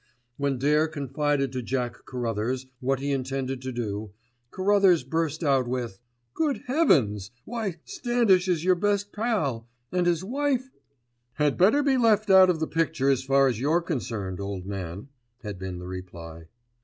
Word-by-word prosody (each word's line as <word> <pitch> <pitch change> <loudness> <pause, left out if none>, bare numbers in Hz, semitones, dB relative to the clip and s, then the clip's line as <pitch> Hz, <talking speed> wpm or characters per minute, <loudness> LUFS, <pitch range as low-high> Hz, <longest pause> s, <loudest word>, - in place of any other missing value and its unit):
When 140 -1 -1
Dare 150 +4 +3
confided 145 -2 -1
to 130 -1 -3
Jack 120 -1 -3
Carruthers 125 +1 -2
what 135 +1 0
he 140 +1 -1
intended 135 -1 -2
to 130 0 -4
do, 105 -4 -4 0.4
Carruthers 190 -3 +3
burst 160 +3 -2
out 135 -4 +2
with— 120 -5 -3 0.3
"Good 305 -4 -1
heavens! 125 - +2 0.2
Why, 220 -6 -3
Standish 230 -7 +2
is 170 -3 +1
your 185 +1 +5
best 205 +2 0
pal 160 - -1 0.2
and 180 -1 +1
his 175 0 +1
wife——" 265 +3 -1 0.6
"Had 150 0 +1
better 220 +11 +4
be 275 -2 +3
left 215 -4 +3
out 190 -1 +8
of 170 -3 +1
the 160 - 0
picture 155 -4 +1
as 130 -1 0
far 135 +1 +4
as 120 -4 -1
you're 150 +6 +2
concerned, 105 - -3
old 100 -2 -5
man," 95 +3 -6 0.3
had 105 -4 -6
been 95 -1 -5
the 90 - -8
reply. 85 -3 -8
140 Hz, 160 wpm, -26 LUFS, 120-185 Hz, 0.6 s, out